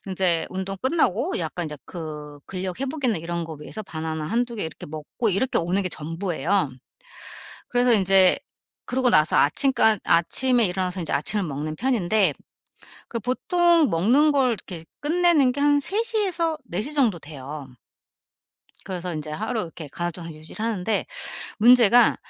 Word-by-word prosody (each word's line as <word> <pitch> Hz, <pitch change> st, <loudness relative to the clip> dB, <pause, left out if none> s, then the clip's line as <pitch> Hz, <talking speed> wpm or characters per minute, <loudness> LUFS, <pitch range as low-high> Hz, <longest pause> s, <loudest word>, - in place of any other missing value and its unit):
인제 185 Hz, -3 st, +1 dB
운동 190 Hz, +1 st, -4 dB
끝나고 260 Hz, -, +1 dB
약간 170 Hz, 0 st, -3 dB
인제 150 Hz, -1 st, -6 dB
그 150 Hz, -3 st, -8 dB
근력 185 Hz, 0 st, -5 dB
회복이나 270 Hz, -, -1 dB
이런 170 Hz, +1 st, -4 dB
거 160 Hz, -, -8 dB
위해서 215 Hz, +8 st, -7 dB
바나나 160 Hz, -4 st, -5 dB
1-2 235 Hz, +5 st, -1 dB
개 -, -, -2 dB
이렇게 160 Hz, -, -8 dB
먹고 155 Hz, +9 st, -3 dB
이렇게 220 Hz, +8 st, +1 dB
오는 180 Hz, +4 st, 0 dB
게 185 Hz, -, -3 dB
전부예요. 165 Hz, +1 st, -1 dB, 1.0 s
그래서 245 Hz, 0 st, +3 dB
인제 190 Hz, -2 st, +5 dB, 0.5 s
그러고 255 Hz, 0 st, +1 dB
나서 155 Hz, -8 st, +4 dB
아침까 220 Hz, -, +3 dB
아침에 240 Hz, +8 st, +3 dB
일어나서 185 Hz, 0 st, -2 dB
인제 165 Hz, -, -3 dB
아침을 200 Hz, +7 st, 0 dB
먹는 155 Hz, +1 st, -4 dB
편인데 220 Hz, -5 st, +2 dB, 0.8 s
그 230 Hz, -, -3 dB
보통 335 Hz, -, +2 dB
먹는 250 Hz, -, +3 dB
걸 270 Hz, -3 st, +3 dB
이렇게 180 Hz, -6 st, -7 dB, 0.2 s
끝내는 315 Hz, -3 st, +3 dB
게 285 Hz, -, -5 dB
한 290 Hz, 0 st, +4 dB
3 400 Hz, +10 st, -1 dB
시에서 380 Hz, -8 st, 0 dB
4 185 Hz, -2 st, -3 dB
시 295 Hz, -, -4 dB
정도 245 Hz, -11 st, +2 dB
돼요. 145 Hz, -1 st, -8 dB, 1.2 s
그래서 180 Hz, -2 st, -4 dB
인제 155 Hz, 0 st, -5 dB
하루 220 Hz, +8 st, -2 dB
이렇게 165 Hz, -3 st, -8 dB
간헐적 170 Hz, +2 st, -5 dB
유지를 155 Hz, +8 st, -8 dB
하는데 220 Hz, -2 st, -1 dB, 0.5 s
문제가 240 Hz, 0 st, +6 dB
195 Hz, 315 characters per minute, -24 LUFS, 165-250 Hz, 1.2 s, 문제가